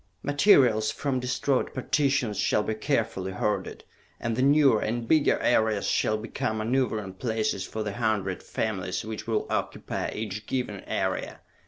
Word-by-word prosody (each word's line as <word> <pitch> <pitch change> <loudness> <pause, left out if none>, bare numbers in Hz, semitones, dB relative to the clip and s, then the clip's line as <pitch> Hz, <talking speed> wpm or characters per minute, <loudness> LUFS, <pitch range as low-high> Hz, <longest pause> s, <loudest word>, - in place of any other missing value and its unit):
Materials 135 - +4
from 140 -3 -1
destroyed 130 +2 -1
partitions 130 -5 +1
shall 105 - +2
be 110 - -1
carefully 110 -6 -1
hoarded, 105 +3 -2 0.4
and 115 -2 -2
the 125 - 0
newer 140 -4 +5
and 115 +1 -2
bigger 155 +1 +4
areas 110 -2 +2
shall 110 - +1
become 110 0 -3
maneuvering 110 -4 -1
places 110 -2 -1
for 110 - -4
the 105 -1 -4
hundred 105 -4 -1
families 95 -3 -3
which 110 0 -6
will 110 -2 0
occupy - - -2
each 105 -1 -5
given 125 -6 -2
area! - - -2
110 Hz, 145 wpm, -27 LUFS, 105-130 Hz, 0.4 s, newer